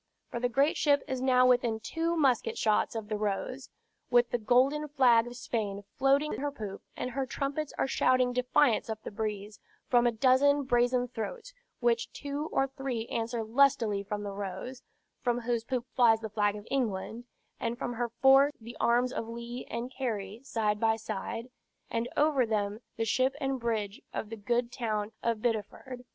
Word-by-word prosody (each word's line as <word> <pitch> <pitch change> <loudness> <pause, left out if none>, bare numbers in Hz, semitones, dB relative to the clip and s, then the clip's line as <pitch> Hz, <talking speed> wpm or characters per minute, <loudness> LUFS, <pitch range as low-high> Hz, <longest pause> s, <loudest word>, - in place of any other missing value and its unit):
For 235 - -3
the 245 0 0
great 275 +5 +2
ship 285 -2 +3
is 260 -1 -3
now 255 -1 +4
within 245 -3 +3
two 330 +8 -1
musket 260 -7 +2
shots 215 +1 +1
of 220 -2 -4
the 215 -1 -3
Rose, 215 +6 -3 0.4
with 240 -1 +4
the 240 - 0
golden 265 +7 +3
flag 245 -5 +4
of 240 0 -8
Spain 205 -4 -3 0.2
floating 275 +3 +3
at - - -4
her 290 +1 -1
poop; 210 -7 -7 0.2
and 250 - -3
her 265 +1 -2
trumpets 280 +4 -3
are - - +2
shouting 255 -2 +2
defiance 250 -1 +2
up 220 0 -5
the - - -6
breeze, 210 -1 -4 0.3
from 240 -1 +5
a - - +3
dozen 270 +5 +4
brazen 245 0 +2
throats, 460 - -6 0.3
which 235 -1 +1
two 290 +2 -4
or 270 - +2
three 265 -4 -4
answer 230 0 -2
lustily 230 -3 +3
from 205 +1 -4
the 200 - -4
Rose, 200 +6 -6 0.4
from 245 -1 0
whose 235 -1 -1
poop 245 0 -2
flies 225 -3 +5
the 220 - -5
flag 205 0 +1
of 210 0 -9
England, 235 -2 -2 0.3
and 230 +1 -2
from 245 - -3
her 240 0 -2
fore 270 +4 +5
the 230 +1 -10
arms 245 +2 +2
of 225 - -4
Leigh 235 +1 -6
and 240 +2 -4
Cary 215 -4 -3
side 215 -5 0
by 225 0 +3
side, 225 +2 -5 0.4
and 230 +1 -1
over 295 -3 +4
them 210 -2 -1 0.2
the 225 - 0
ship 260 +4 +1
and 270 -2 -1
bridge 220 -3 -2
of 220 - -4
the - - -3
good 235 +3 -1
town 215 -4 -2
of 230 -2 -1
Bideford. 245 +2 -3
240 Hz, 185 wpm, -30 LUFS, 220-260 Hz, 0.4 s, from